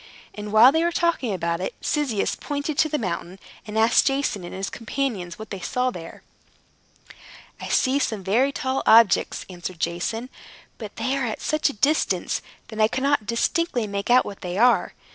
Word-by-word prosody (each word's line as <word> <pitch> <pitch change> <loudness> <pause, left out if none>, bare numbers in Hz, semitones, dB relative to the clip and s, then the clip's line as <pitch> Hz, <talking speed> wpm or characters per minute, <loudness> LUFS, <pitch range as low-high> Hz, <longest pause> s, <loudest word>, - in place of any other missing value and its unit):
And 210 0 -7
while 225 +5 +8
they 320 +3 +1
were 345 - +1
talking 340 -9 0
about 170 -2 -2
it, 190 - -4
Cyzicus 275 -9 -1
pointed 290 +1 -4
to 310 - +3
the 300 - 0
mountain, 180 -4 -4 0.3
and 210 +1 -5
asked 225 +1 +4
Jason 270 -8 -1
and 175 - -8
his 195 +1 -4
companions 225 -8 -3
what 220 -1 -10
they 195 - -5
saw 250 +7 -1
there. 165 -5 -10 1.4
"I - - -6
see 265 +1 +2
some 220 -8 -2
very 235 +9 +2
tall 265 -1 -2
objects," 225 -2 +4
answered 180 -1 -7
Jason; 205 +10 -3 0.5
"but - - -8
they 265 - -1
are 270 -3 -1
at 220 - -4
such 305 0 0
a - - -5
distance 285 +8 0 0.3
that 220 -1 -3
I 215 - +6
cannot 265 -2 0
distinctly 245 - 0
make 200 0 -4
out 250 +1 +5
what 200 - -8
they 180 0 -4
are. 245 +3 +3
225 Hz, 180 wpm, -23 LUFS, 195-275 Hz, 1.4 s, while